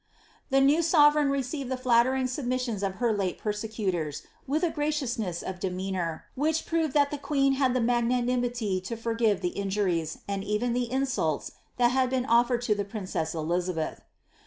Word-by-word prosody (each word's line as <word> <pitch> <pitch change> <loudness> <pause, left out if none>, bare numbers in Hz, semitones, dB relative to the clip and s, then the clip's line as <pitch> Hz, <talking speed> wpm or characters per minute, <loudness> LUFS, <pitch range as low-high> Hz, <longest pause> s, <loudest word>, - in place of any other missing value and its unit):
The 270 0 +4
new 290 +5 +4
sovereign 300 -3 +5
received 275 0 -2
the 260 - -1
flattering 255 +1 +3
submissions 250 -4 -2
of 195 -1 -1
her 235 +1 +1
late 190 -3 -1
persecutors, 205 -8 -3 0.2
with 300 +6 0
a 340 - +2
graciousness 255 - -2
of 185 -1 -5
demeanour, 185 -3 -3
which 315 +3 0
proved 320 -4 0
that 285 -1 +4
the 295 - -4
queen 275 -1 +2
had 265 -2 +1
the 255 - +2
magnanimity 240 -3 0
to 190 +5 -5
forgive 225 -3 +1
th^ 180 -1 -1
injuries, 190 -5 -1
and 200 -1 -2
even 210 +4 0
the 245 -1 -1
insults, 255 - -1 0.3
that 240 -1 +4
had 260 -1 +2
been 255 -1 0
oflered 240 +1 +3
to 225 - +2
the 205 -1 -2
princess 185 -6 -4
Elizabeth. 165 0 -2
240 Hz, 165 wpm, -27 LUFS, 195-265 Hz, 0.3 s, sovereign